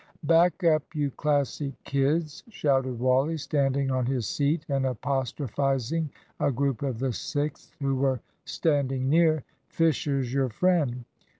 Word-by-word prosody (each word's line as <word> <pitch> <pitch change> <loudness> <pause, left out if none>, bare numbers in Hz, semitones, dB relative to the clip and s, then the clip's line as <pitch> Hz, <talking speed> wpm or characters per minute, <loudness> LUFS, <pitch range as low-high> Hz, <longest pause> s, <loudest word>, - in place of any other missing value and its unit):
"Back 170 +4 +3
up, 155 -2 +4
you 145 -2 0
Classic 145 0 -1
kids!" 145 +2 0
shouted 135 - 0
Wally, 130 +6 +2
standing 140 -1 0
on 130 -2 0
his 125 -5 -1
seat 150 +2 0
and 135 -2 0
apostrophising 135 +3 -1 0.3
a 140 - +2
group 135 -1 -1
of 135 -4 -2
the 130 +1 -1
Sixth 145 +5 -4
who 135 -1 0
were 130 -1 +1 0.2
standing 135 -4 0
near. 155 -3 +4 0.2
"Fisher's 140 -6 0
your 135 -2 +1
friend! 135 -4 +1
140 Hz, 130 wpm, -27 LUFS, 130-150 Hz, 0.3 s, up